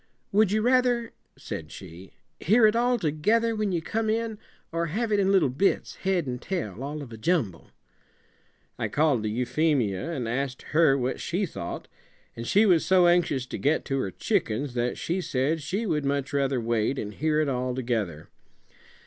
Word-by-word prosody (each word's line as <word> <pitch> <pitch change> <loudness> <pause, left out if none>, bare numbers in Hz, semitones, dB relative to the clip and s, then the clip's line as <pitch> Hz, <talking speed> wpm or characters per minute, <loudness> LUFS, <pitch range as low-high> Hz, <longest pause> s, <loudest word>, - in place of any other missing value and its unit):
"Would 205 -1 +3
you 215 +1 +1
rather," 245 -2 +2 0.2
said 80 -1 -7
she, 95 0 -11 0.3
"hear 220 +6 +4
it 215 +1 +4
altogether, 230 -1 +1
when 215 -2 -1
you 170 -3 -1
come 220 +3 -1
in, 225 -1 -1 0.3
or 170 0 -1
have 215 +7 -2
it 205 - +3
in 195 -1 +3
little 170 -10 +3
bits, 175 +10 0
head 190 -4 0
and 125 -1 -4
tail, 130 - -4
all 145 +1 -5
of 125 - -11
a - - -8
jumble?" 115 - -1 1.1
I - - 0
called 145 -6 +2
to 110 - -2
Euphemia 125 - 0
and 130 -8 -3
asked 130 +2 -3
her 155 -4 +5
what 130 0 -2
she 180 +4 -1
thought, 85 - -6 0.5
and 115 0 -6
she 210 +3 +4
was 175 -6 +4
so 185 -1 +4
anxious 175 -7 +2
to - - -6
get 150 +3 +1
to 135 0 -1
her 100 - -1
chickens 120 +7 -1
that 120 0 -1
she 180 +3 -2
said 150 +1 0
she 190 +10 -2
would 150 -7 0
much 140 0 -1
rather 135 -2 +1
wait 115 +2 0
and 105 -3 -4
hear 155 +5 0
it 155 - +1
all 125 -1 -1
together. 110 -11 -2
150 Hz, 185 wpm, -26 LUFS, 125-195 Hz, 1.1 s, her